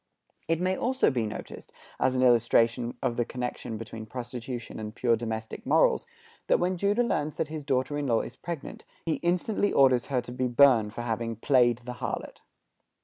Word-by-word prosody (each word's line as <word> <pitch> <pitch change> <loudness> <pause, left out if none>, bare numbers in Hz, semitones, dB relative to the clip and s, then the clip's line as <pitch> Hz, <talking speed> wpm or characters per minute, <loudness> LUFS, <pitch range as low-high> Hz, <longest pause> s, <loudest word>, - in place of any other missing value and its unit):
It 165 0 +1
may 185 +1 +1
also 260 - +2
be 120 -4 -1
noticed, 105 - -8 0.3
as 130 - +2
an 130 - +2
illustration 115 0 +3
of 120 -3 0
the 120 - +2
connection 125 -2 -5
between 110 0 -8
prostitution 125 0 -6
and 105 0 -6
pure 120 -2 +2
domestic 110 -1 -5
morals, - - +3 0.4
that - - +4
when 180 +1 +1
Judah 200 +6 +2
learns 150 -10 -1
that 155 - -2
his 155 -1 -5
daughter 135 +1 0
in 145 - -2
law 115 -2 +2
is 125 - -8
pregnant, 160 +1 -7 0.2
he 165 - 0
instantly 180 +4 0
orders 130 -3 +4
her 135 -3 +1
to 120 0 -7
be 125 +1 -1
burned 120 -4 +4
for 120 - -4
having 115 0 -2
"played 120 0 +3
the 125 - -5
harlot." - - -4
125 Hz, 185 wpm, -28 LUFS, 115-145 Hz, 0.4 s, that